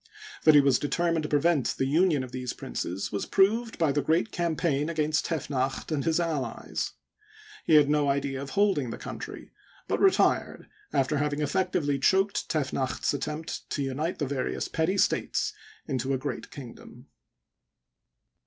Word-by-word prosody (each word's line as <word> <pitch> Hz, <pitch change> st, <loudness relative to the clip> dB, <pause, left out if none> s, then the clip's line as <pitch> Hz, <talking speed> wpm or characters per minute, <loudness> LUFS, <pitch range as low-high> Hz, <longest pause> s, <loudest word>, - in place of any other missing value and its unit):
That 155 Hz, -1 st, +8 dB
he 145 Hz, -, +9 dB
was 135 Hz, -3 st, +3 dB
determined 165 Hz, +2 st, 0 dB
to 150 Hz, -, -4 dB
prevent 150 Hz, -1 st, +2 dB
the 135 Hz, -, +1 dB
union 155 Hz, 0 st, +3 dB
of 130 Hz, -, -8 dB
these 125 Hz, -2 st, -4 dB
princes 95 Hz, +3 st, -4 dB
was 100 Hz, -, -3 dB
proved 220 Hz, +4 st, +2 dB
by 160 Hz, -4 st, +2 dB
the 145 Hz, +1 st, +1 dB
great 165 Hz, +9 st, +1 dB
campaign 160 Hz, -3 st, 0 dB
against 155 Hz, -1 st, 0 dB
Tefnacht 135 Hz, -3 st, -2 dB
and 145 Hz, -3 st, 0 dB
his 165 Hz, 0 st, +1 dB
allies. 155 Hz, -8 st, -2 dB, 0.7 s
He 160 Hz, -, +5 dB
had 150 Hz, -2 st, +7 dB
no 145 Hz, -1 st, +2 dB
idea 140 Hz, -1 st, -1 dB
of 140 Hz, -, -6 dB
holding 195 Hz, -, +2 dB
the -, -, -5 dB
country, -, -, -8 dB, 0.4 s
but -, -, 0 dB
retired 390 Hz, -1 st, +2 dB, 0.2 s
after 135 Hz, +3 st, +1 dB
having 150 Hz, 0 st, -1 dB
effectually 145 Hz, -3 st, 0 dB
checked 195 Hz, +7 st, +2 dB
Tefnacht's 135 Hz, -4 st, -1 dB
attempt 150 Hz, +2 st, -4 dB
to 145 Hz, -, -2 dB
unite 145 Hz, +6 st, -2 dB
the 145 Hz, -, -1 dB
various 135 Hz, -1 st, -2 dB
petty 165 Hz, +5 st, 0 dB
states -, -, +1 dB, 0.3 s
into 130 Hz, +1 st, -1 dB
a -, -, 0 dB
great 130 Hz, -, -5 dB
kingdom. 125 Hz, -5 st, -11 dB
150 Hz, 155 wpm, -27 LUFS, 135-165 Hz, 0.7 s, he